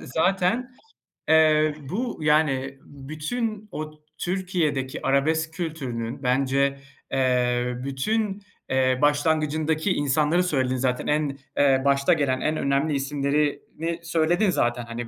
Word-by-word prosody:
zaten, 195 - 0 0.6
eee, 155 -1 +5 0.2
bu, 240 +7 -3
yani, 140 -3 +1
bütün 195 - -5
o 155 0 -5 0.3
Türkiye'deki 175 -8 -2
arabesk 160 +4 +1
kültürünün, 135 -7 -4
bence, 135 +2 +1 0.3
eee, 125 -1 +1
bütün, 200 +10 -1 0.3
eee, 130 -1 +2
başlangıcındaki 155 +3 +1
insanları 150 +5 +2
söyledin 130 -7 0
zaten. 125 -1 -1
En, 150 -2 0 0.2
eee, 135 -2 +4
başta 140 +4 +3
gelen, 140 -5 0
en 155 0 0
önemli 140 +2 +1
isimlerini 145 +4 -1
söyledin 170 +4 +2
zaten, 120 -7 0
hani, 115 0 -6
150 Hz, 105 wpm, -24 LUFS, 135-160 Hz, 0.6 s, eee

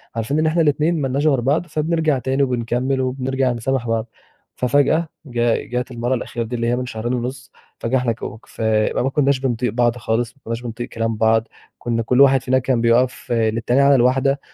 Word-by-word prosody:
عارفين 115 +7 -1
إن 155 - +1
إحنا 165 +2 +2
الاتنين 155 +2 +1
ما 135 - 0
لناش 140 +4 0
غير 135 -5 +3
بعض، 140 +8 +1
فبنرجع 155 -2 0
تاني 135 +2 0
وبنكمّل 125 +1 -1
وبنرجع 130 0 -1
نسامح 120 +1 -2
بعض. 115 0 -1 0.5
ففجأة، 145 +6 +2 0.2
جا 120 -3 +1
جات 125 +1 -3
المرة 120 +1 -1
الأخيرة 120 -1 -3
دي 115 +2 -5
اللي 115 0 -1
هي 120 - +2
من 125 0 -3
شهرين 120 0 -4
ونص، 125 +1 -4 0.3
فجأة 120 +3 0
إحنا 125 -2 0
ك 115 - -7 0.3
فبقى 110 +1 0
ما 135 - +1
كناش 140 -1 +1
بنطيق 125 -3 -1
بعض 120 0 +1
خالص، 115 +1 -1
ما 140 - -31
كناش 115 +1 -4
بنطيق 120 0 -6
كلام 115 0 -2
بعض، 110 0 +2 0.3
كنا 115 -1 -1
كل 125 +4 +3
واحد 135 -1 +6
فينا 130 +1 +2
كان 130 -2 0
بيقف 120 +2 +1
للتاني 115 +3 +1
على 140 0 +5
الواحدة، 135 +2 +2
125 Hz, 200 wpm, -20 LUFS, 115-135 Hz, 0.5 s, واحد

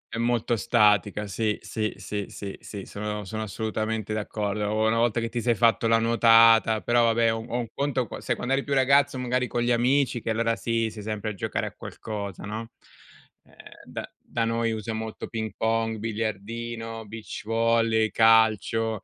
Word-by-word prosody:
È - - -3
molto 120 0 +1
statica, 105 -2 +3
sì, 105 +2 -1
sì, 110 -1 -2
sì, 100 +1 -4
sì, 100 -1 -7
sì, 100 -2 -8
sono 105 0 -5
sono 110 +3 -5
assolutamente 110 0 -3
d'accordo, 105 -1 -2
una 110 +1 +2
volta 115 0 +2
che 115 - -2
ti 120 +1 -3
sei 120 0 +2
fatto 115 0 +3
la 115 - +4
nuotata 115 -1 +5
però, 120 0 +3
vabbè, 115 0 +3
o 115 - -3
o 120 +1 -4
un 120 -2 -2
conto 140 -3 -1
qua - - -8
sai, - - -1
quando 130 +2 -2
eri 135 - +1
più 140 - -1
ragazzo 140 +1 +4
magari 125 0 0
con 120 -1 -1
gli 120 - +1
amici 125 0 +2
che, - - -4
allora, 115 +1 +1
sì, 115 -1 -1
sei 105 0 -9
sempre 110 0 -3
a - - -6
giocare 95 - -3
a - - -5
qualcosa, 100 -4 -7
no? 110 +3 -6 0.7
Ehm, - - -23 0.3
da - - -6
da 115 -1 -2
noi 115 0 0
usa 110 0 -4
molto 110 0 -5
ping 110 -2 -4
pong, 115 0 0
biliardino, 115 +1 -4
beach 110 +1 -7
volley, 115 -1 +2
calcio, 110 -1 +3
115 Hz, 185 wpm, -26 LUFS, 110-115 Hz, 0.7 s, nuotata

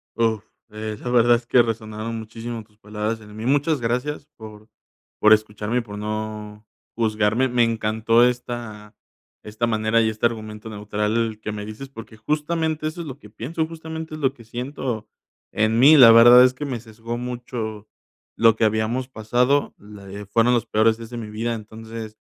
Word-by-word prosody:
Uf, 110 -2 +1 0.3
eh, 110 0 -6
la 125 - -5
verdad 120 -1 +5
es 120 - -4
que 120 0 +5
resonaron 110 0 -4
muchísimo 115 +1 -7
tus 105 0 -30
palabras 105 +1 -4
en 105 0 -13
mí. 110 - -6
Muchas 145 +2 +2
gracias 125 +5 -2
por 110 -1 -12 0.5
por 110 0 +7
escucharme 110 +1 0
y - - -2
por 105 -3 -9
no 105 0 -5 0.3
juzgarme. 110 +2 +1
Me 120 -1 +3
encantó 115 +1 +2
esta 120 -4 -5 0.5
esta 110 +2 -2
manera 110 +1 +2
y 110 - +2
este 110 +1 -2
argumento 110 -1 -3
neutral 105 +1 -2
que 110 - -4
me 105 -1 -6
dices, 110 +6 -8
porque 115 -4 -11
justamente 155 +4 -1
eso 170 +3 -5
es 165 - -7
lo 135 - -7
que 105 - -14
pienso, 160 +10 -3
justamente 160 -1 -7
es - - -8
lo 135 0 +2
que 120 - -16
siento 120 -1 -5 0.5
en 110 +1 +2
mí. 145 +5 +8
La 120 -4 +10
verdad, 120 +2 +9
es 130 0 +4
que 145 +3 -6
me 130 -4 -3
sesgó 115 +1 -7
mucho 120 -3 -5 0.5
lo 115 -1 +5
que 115 - +3
habíamos 110 +4 0
pasado, 125 +4 +1
le 100 -1 -10
fueron 115 +4 +2
los 120 -2 +1
peores 110 0 +2
días 115 -1 -10
de 120 - -7
mi 110 -2 -6
vida, 115 +2 -2
entonces, 110 0 -9
115 Hz, 180 wpm, -22 LUFS, 110-125 Hz, 0.5 s, La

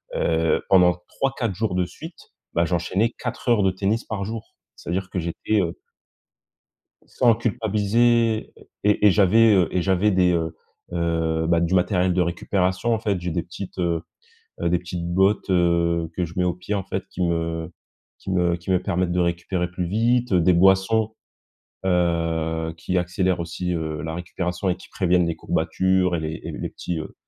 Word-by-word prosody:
heu, 80 0 +1
pendant 90 -2 +5
3-4 130 -6 -2
jours 105 -2 -1
de 90 -1 +1
suite, 160 - -10 0.4
bah, 85 0 +2
j'enchaînais 90 +6 0
4 - - -4
heures 110 -4 +4
de 95 - +3
tennis 100 +5 -1
par 100 -3 -4
jour, 110 +1 -7 0.2
c'est-à-dire 95 +2 -4
que 90 - -3
j'étais, 85 +5 -1
heu 85 -2 -3 1.3
Sans 120 -3 +3
culpabiliser 115 0 +1 0.3
et 105 0 +3
et - - +6
j'avais, 110 +3 +5
heu, 90 -3 +4
et 90 - +1
j'avais 95 +3 +2
des, 90 -2 +3
heu, 80 -1 -1 0.4
heu, 80 -1 0
bah, 85 0 +3
du 85 +2 0
matériel 90 -1 +2
de 90 - +2
récupération. 90 +5 0
En 110 - 0
fait, 100 -5 -1
j'ai 90 - -2
des 85 -1 -1
petites, 95 +2 -9
heu, 85 -2 0 0.6
heu, - - +1
des 90 - +2
petites 90 0 -5
bottes, 95 +4 +2
heu, 85 -2 +2
que 90 - 0
je 85 +1 -8
mets 90 - +1
aux 90 - +1
pieds, 100 +3 -4
en 100 - -1
fait, 95 0 -4
qui 90 - -4
me 85 -1 -1 0.5
qui - - -7
me 85 -1 +2
qui 85 +2 -7
me 90 - +2
permettent 90 -2 0
de 90 - +1
récupérer 85 +1 -1
plus 90 0 -3
vite, 115 +3 +1
des 90 +1 +4
boissons, 95 +5 +3 0.7
heu, 85 -2 0
qui 90 +3 -2
accélèrent 90 0 0
aussi, 90 +2 -3
heu, 80 -2 -3
la 80 0 -4
récupération 90 +1 -3
et 90 - -1
qui - - -15
préviennent 90 -2 +2
les 85 - -2
courbatures 95 -2 +1
et - - -3
les 80 0 -4
et - - -4
les - - -4
petits, 85 -2 -4
heu, 80 - -7
90 Hz, 185 wpm, -23 LUFS, 85-100 Hz, 1.3 s, et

